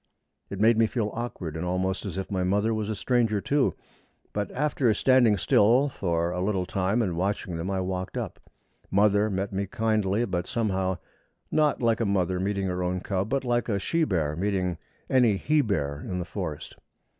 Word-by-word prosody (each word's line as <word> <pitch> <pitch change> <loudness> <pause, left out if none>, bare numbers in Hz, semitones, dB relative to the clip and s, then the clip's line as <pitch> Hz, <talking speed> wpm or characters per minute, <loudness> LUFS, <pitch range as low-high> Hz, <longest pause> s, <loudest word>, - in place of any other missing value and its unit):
It 100 - -6
made 110 +1 +4
me 115 - +5
feel 110 -3 -2
awkward, 105 -9 -5
and 80 - -3
almost 95 +2 -1
as 95 - -5
if 95 - -4
my 95 -2 0
mother 105 +4 +1
was 110 -1 -2
a 110 - -1
stranger, 115 -3 +1
too; 140 +6 +1 0.6
but 105 0 -2
after 140 -3 +1
standing 125 -5 +4
still 120 +9 +4
a 85 -1 0
little 95 -1 0
time 95 +5 0
and 90 -5 -2
watching 95 0 -2
them 85 +3 -3
I 95 -1 -1
walked 95 0 -3
up. - - -4 0.5
Mother 105 +1 +3
met 95 0 -2
me 100 +1 -1
kindly, 110 +1 +1
but, 90 -4 -2
somehow, 95 -5 0 0.5
not 150 -4 +2
like 115 -1 +3
a 115 - +1
mother 95 -2 +1
meeting 100 +1 -1
her 90 -1 -2
own 90 +1 -1
cub, 95 +1 -2
but 135 +2 0
like 120 -1 0
a 100 - +1
she 165 - 0
bear 80 - 0
meeting 90 -2 -1 0.3
any 120 -6 +4
he 150 +9 +2
bear 70 - -1
in 90 - -4
the 90 - -3
forest. 90 -5 -6
100 Hz, 190 wpm, -27 LUFS, 90-115 Hz, 0.6 s, me